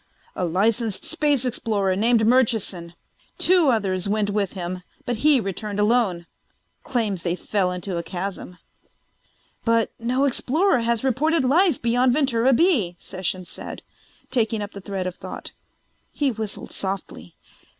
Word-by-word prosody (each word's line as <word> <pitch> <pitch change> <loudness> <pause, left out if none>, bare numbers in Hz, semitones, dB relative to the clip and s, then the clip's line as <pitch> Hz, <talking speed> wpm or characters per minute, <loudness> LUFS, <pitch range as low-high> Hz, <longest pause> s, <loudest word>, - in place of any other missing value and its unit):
"A 180 - -1
licensed 210 +4 0
space 295 -5 +1
explorer 210 -6 0
named 225 +2 +3
Murchison. 215 -8 +1 0.4
Two 350 -5 +4
others 195 -5 0
went 205 0 +1
with 200 -2 -1
him 180 -1 -5 0.2
but 245 -3 -1
he 290 +2 +5
returned 205 0 -4
alone. 205 -6 +2 0.6
Claims 215 -8 -1
they 170 0 -1
fell 185 -1 -1
into 180 0 -4
a - - -1
chasm." 180 0 -6 1.1
"But 230 -1 +2
no 250 +4 +1
explorer 280 +4 +2
has 235 0 0
reported 275 +3 +2
life 325 +2 +4
beyond 245 +2 +2
Ventura 260 -3 +2
B," 250 - +3
Sessions 185 0 -4
said, - - -8 0.5
taking 225 -3 +1
up 205 - -7
the 200 - -9
thread 190 -1 -4
of 185 -1 -4
thought. - - -8 0.6
He 285 -3 0
whistled 220 -2 -6
softly. 190 - -5
220 Hz, 140 wpm, -23 LUFS, 190-255 Hz, 1.1 s, he